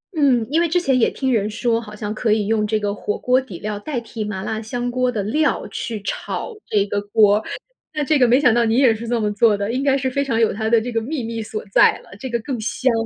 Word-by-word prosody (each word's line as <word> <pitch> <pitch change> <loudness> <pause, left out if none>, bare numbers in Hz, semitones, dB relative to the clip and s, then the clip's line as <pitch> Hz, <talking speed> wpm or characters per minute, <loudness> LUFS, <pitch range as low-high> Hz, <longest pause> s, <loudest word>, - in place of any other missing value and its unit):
嗯， 265 -7 +3
因 325 +3 +3
为 340 - +1
之 355 +3 +2
前 270 -7 +1
也 - - +3
听 265 -2 -1
人 210 -2 +1
说， 230 +1 0
好 210 -2 -10
像 210 0 -4
可 220 0 0
以 215 -1 +2
用 215 0 +1
这 215 0 0
个 205 -1 -2
火 205 0 -3
锅 255 +1 +2
底 205 -9 -9
料 210 -1 -4
代 255 +3 -3
替 225 -1 -6
麻 195 -2 -4
辣 220 +1 -3
香 245 +2 -3
锅 255 0 +1
的 210 -4 -2
料， 290 +7 0
去 225 -3 -4
炒 470 - -4
这 205 -2 +2
个 205 0 -2
锅。 205 +1 +3 0.5
那 300 - 0
这 290 +1 +2
个 250 - +5
没 245 +3 +4
想 250 -6 +4
到 240 0 +3
你 225 0 +1
也 255 -4 +5
是 225 +2 -7
这 240 0 0
么 210 -1 0
做 210 0 +3
的， 200 +2 -2
应 260 +3 -1
该 275 -1 +3
是 260 -1 -2
非 280 +2 0
常 230 -5 -1
有 225 - +3
它 220 +1 -2
的 230 0 +5
这 240 +3 -5
个 225 -1 0
秘 265 +2 -4
密 230 0 -4
所 215 0 -5
在 - - +5
了， - - -19
这 260 - -5
个 235 -1 -1
更 245 0 -4
香。 250 +3 0
230 Hz, 300 characters per minute, -20 LUFS, 215-255 Hz, 0.5 s, 个